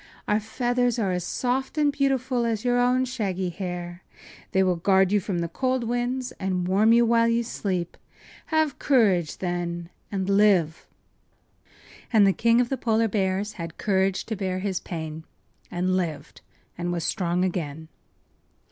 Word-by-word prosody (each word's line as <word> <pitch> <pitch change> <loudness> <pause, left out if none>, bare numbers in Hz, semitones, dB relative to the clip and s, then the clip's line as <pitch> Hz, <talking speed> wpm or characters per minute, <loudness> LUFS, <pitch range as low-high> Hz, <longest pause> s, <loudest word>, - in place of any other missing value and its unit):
Our 210 - +2
feathers 245 +2 0
are 200 -5 0
as 180 -1 -1
soft 260 - -2
and 295 -1 +3
beautiful 265 -3 0
as 230 -1 -1
your 245 0 +3
own 250 +1 +3
shaggy 195 -8 -2
hair. 175 -1 -6 0.5
They 190 - +3
will 180 -2 +1
guard 190 +2 +3
you 205 - +4
from 185 -3 -3
the 170 - -1
cold 255 +8 -1
winds 245 +2 -2
and 185 -2 -1
warm 205 +4 +4
you 235 +1 +5
while 230 0 +3
you 230 0 +2
sleep. 185 -6 -3 0.5
Have 315 -2 +1
courage, 200 - +2
then, 175 -1 -3 0.2
and 190 -2 -2
live!” 195 -6 +3 1.2
And 215 -4 +6
the 195 - +4
King 230 +3 +3
of 245 -1 +1
the 270 - -1
Polar 225 -1 +1
Bears 195 0 -1
had 165 0 -7
courage 190 -1 0
to 220 - -3
bear 190 -2 -2
his 190 -1 -2
pain 160 -2 -6 0.5
and 185 +1 0
lived 170 -5 -4 0.4
and 175 0 -2
was 170 -2 -2
strong 180 +1 0
again. 160 -4 -4
200 Hz, 160 wpm, -25 LUFS, 180-240 Hz, 1.2 s, And